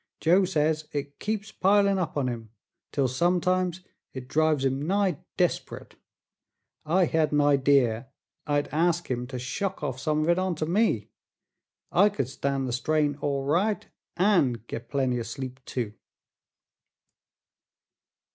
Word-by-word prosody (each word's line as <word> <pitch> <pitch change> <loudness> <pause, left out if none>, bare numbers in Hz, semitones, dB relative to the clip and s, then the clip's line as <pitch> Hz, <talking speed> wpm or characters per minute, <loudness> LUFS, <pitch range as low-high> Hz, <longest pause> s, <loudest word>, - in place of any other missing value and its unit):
Joe 180 +4 +4
says 155 -3 0
it 145 -1 -4
keeps 215 0 -3
pilin' 200 0 +3
up 170 -4 -2
on 135 -3 +1
him, 115 -3 -5 0.4
till 140 -2 +1
sometimes 180 +5 +1 0.3
it 130 -1 -7
drives 155 -1 +2
him 135 +1 0
nigh 195 -4 +1 0.2
desp'rit. - - -1 0.9
I 175 +4 +3
hed 160 -2 +1
an 150 - +2
idee 135 -4 +3 0.4
I'd 145 -1 +1
ask 170 0 +1
him 125 0 -2
to 130 0 -6
shuck 185 +10 -3
off 130 -3 -3
some 155 +2 0
of 160 - 0
it 175 +1 +3
onter 180 -4 -1
me. 175 - +1 0.8
I 200 +6 +5
could 135 - -3
stan' 135 0 -2
the 125 - -3
strain 150 +3 +1
all 140 -2 -1
right, 190 +9 +1 0.3
an' 170 - +3
get 115 0 -7
plenty 130 -2 0
o' - - -2
sleep 130 +3 -6
too." 115 -5 -3
150 Hz, 140 wpm, -27 LUFS, 130-180 Hz, 0.9 s, I